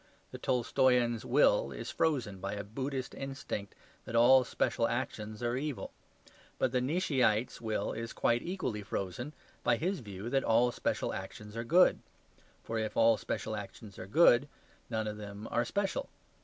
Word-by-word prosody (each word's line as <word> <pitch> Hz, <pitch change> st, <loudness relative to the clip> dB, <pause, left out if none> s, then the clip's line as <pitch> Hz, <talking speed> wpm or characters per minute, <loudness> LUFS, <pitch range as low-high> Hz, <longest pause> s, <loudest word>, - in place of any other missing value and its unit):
The -, -, -7 dB
Tolstoyan's 125 Hz, -1 st, +2 dB
will 70 Hz, -, +3 dB
is -, -, -6 dB
frozen 125 Hz, -12 st, 0 dB
by 100 Hz, +2 st, -3 dB
a 100 Hz, 0 st, -4 dB
Buddhist 130 Hz, +5 st, -4 dB
instinct 135 Hz, -7 st, -5 dB, 0.3 s
that 115 Hz, -, -5 dB
all 130 Hz, +3 st, +7 dB
special -, -, 0 dB
actions 110 Hz, +1 st, -4 dB
are 120 Hz, 0 st, 0 dB
evil. 145 Hz, 0 st, -3 dB, 0.7 s
But 130 Hz, -, +1 dB
the 125 Hz, -1 st, +1 dB
Nietzscheite's 130 Hz, -, +1 dB
will 110 Hz, -2 st, -1 dB
is 115 Hz, +1 st, -5 dB
quite 120 Hz, 0 st, +1 dB
equally 170 Hz, -, -3 dB
frozen 100 Hz, +6 st, -4 dB, 0.3 s
by 120 Hz, -, +4 dB
his 180 Hz, +8 st, -1 dB
view 100 Hz, -1 st, -7 dB
that 135 Hz, -1 st, +2 dB
all 120 Hz, +2 st, +4 dB
special -, -, -1 dB
actions 105 Hz, 0 st, -7 dB
are 115 Hz, -, -2 dB
good; 175 Hz, +9 st, +5 dB, 0.6 s
for 115 Hz, 0 st, -2 dB
if 110 Hz, -1 st, -3 dB
all 115 Hz, 0 st, +6 dB
special -, -, -3 dB
actions 105 Hz, -3 st, -9 dB
are 95 Hz, -, -7 dB
good, 140 Hz, +1 st, +5 dB, 0.4 s
none 110 Hz, -2 st, -1 dB
of 105 Hz, 0 st, -4 dB
them 105 Hz, +1 st, -8 dB
are 120 Hz, -, +2 dB
special. 200 Hz, -, -2 dB
120 Hz, 160 wpm, -32 LUFS, 105-135 Hz, 0.7 s, all